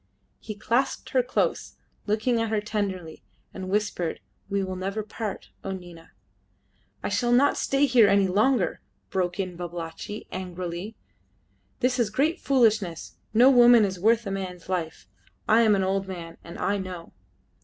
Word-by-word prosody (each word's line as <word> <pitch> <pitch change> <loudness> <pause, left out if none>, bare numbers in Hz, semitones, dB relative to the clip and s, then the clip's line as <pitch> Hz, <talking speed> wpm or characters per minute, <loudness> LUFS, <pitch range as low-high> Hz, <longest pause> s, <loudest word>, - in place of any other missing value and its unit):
He 215 - -7
clasped 235 +6 -1
her 260 - +4
close, 250 +1 -1 0.3
looking 225 +3 +1
at 225 - -1
her 215 -1 +1
tenderly, 195 -6 -4 0.3
and 185 -1 -6
whispered, 195 -5 -1 0.3
"We 200 -1 0
will 185 0 -4
never 195 +4 -3
part, 215 -1 -6
O 195 - -3
Nina!" 175 -3 -11 0.9
"I - - -1
shall 240 +4 +1
not 255 +4 +4
stay 275 +1 +2
here 245 -5 +5
any 200 -1 +4
longer," 210 +3 +1 0.3
broke 180 -1 -1
in 185 -2 -3
Babalatchi, 175 +4 -6
angrily. 180 +2 -5 0.9
"This 250 0 +1
is 230 -3 +2
great 300 - +1
foolishness. 215 - +1
No 245 +5 +6
woman 240 -3 +7
is 190 -2 -4
worth 225 +4 +3
a 195 - -3
man's 185 -2 -5
life. 165 - -3 0.4
I 220 +2 +5
am 215 -3 +5
an 195 - +1
old 195 +1 0
man, 170 -3 -7
and 170 - -9
I 205 0 0
know." 180 -3 -7
200 Hz, 155 wpm, -26 LUFS, 185-230 Hz, 0.9 s, woman